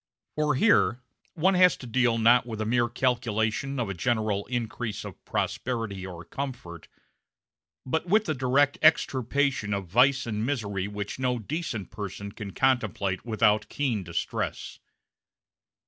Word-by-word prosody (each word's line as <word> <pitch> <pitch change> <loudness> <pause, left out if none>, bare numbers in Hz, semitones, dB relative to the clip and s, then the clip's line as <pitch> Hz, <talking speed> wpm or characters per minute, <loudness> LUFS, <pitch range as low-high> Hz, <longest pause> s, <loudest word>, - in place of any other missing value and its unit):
For 150 -3 +1
here 135 - +3 0.4
one 185 +4 +3
has 180 -1 +5
to - - -10
deal 120 -1 +2
not 120 +2 +4
with 110 -2 -5
a 110 - -1
mere 120 +1 +2
calculation 120 +1 0
of 120 - -1
a 100 - -3
general 105 +1 -1
increase 115 -3 -3
of 100 -4 -10
prosperity 115 -6 -2
or 85 -2 -9
comfort, 120 - -6 1.0
but 160 +6 -1
with 215 +4 +3
the 155 - 0
direct 135 +2 +2
extirpation 135 -7 +2
of 100 -1 -4
vice 130 +9 +3
and 110 -2 -2
misery 100 -7 -2
which 105 +3 -5
no 125 -1 0
decent 115 - -4
person 100 -1 -6
can 105 -1 -7
contemplate 105 -6 0
without 105 -1 +2
keen 125 -8 -1
distress. 85 -1 -4
120 Hz, 140 wpm, -27 LUFS, 105-130 Hz, 1.0 s, has